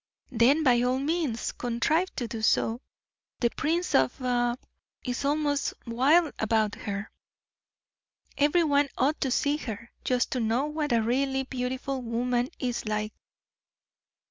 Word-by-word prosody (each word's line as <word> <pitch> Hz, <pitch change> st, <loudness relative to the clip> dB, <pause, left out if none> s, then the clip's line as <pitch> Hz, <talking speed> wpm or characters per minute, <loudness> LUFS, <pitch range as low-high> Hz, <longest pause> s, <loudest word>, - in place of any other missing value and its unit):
"Then, 260 Hz, +6 st, +4 dB
by 245 Hz, -4 st, +4 dB
all 250 Hz, +1 st, +1 dB
means, 285 Hz, -4 st, -1 dB
contrive 245 Hz, +9 st, 0 dB
to 240 Hz, -, -3 dB
do 225 Hz, -1 st, -5 dB
so. 225 Hz, +2 st, +2 dB, 0.6 s
The 235 Hz, -1 st, +2 dB
Prince 335 Hz, +3 st, -1 dB
of 130 Hz, -1 st, +3 dB
B 245 Hz, 0 st, -3 dB
is 245 Hz, -, -3 dB
almost 290 Hz, 0 st, 0 dB
wild 280 Hz, +7 st, +3 dB
about 220 Hz, -1 st, +1 dB
her. 200 Hz, 0 st, -5 dB, 1.2 s
Every 295 Hz, +4 st, +3 dB
one 285 Hz, -2 st, +2 dB
ought 285 Hz, +5 st, +1 dB
to 270 Hz, -, +1 dB
see 285 Hz, +3 st, +1 dB
her, 230 Hz, -5 st, -7 dB
just 250 Hz, -1 st, 0 dB
to 255 Hz, -, -1 dB
know 230 Hz, +4 st, +1 dB
what 300 Hz, -1 st, -2 dB
a 230 Hz, -2 st, +3 dB
really 265 Hz, +3 st, 0 dB
beautiful 260 Hz, +1 st, -3 dB
woman 245 Hz, +1 st, -1 dB
is 245 Hz, -3 st, -3 dB
like." 215 Hz, 0 st, -2 dB
255 Hz, 140 wpm, -27 LUFS, 235-285 Hz, 1.2 s, Then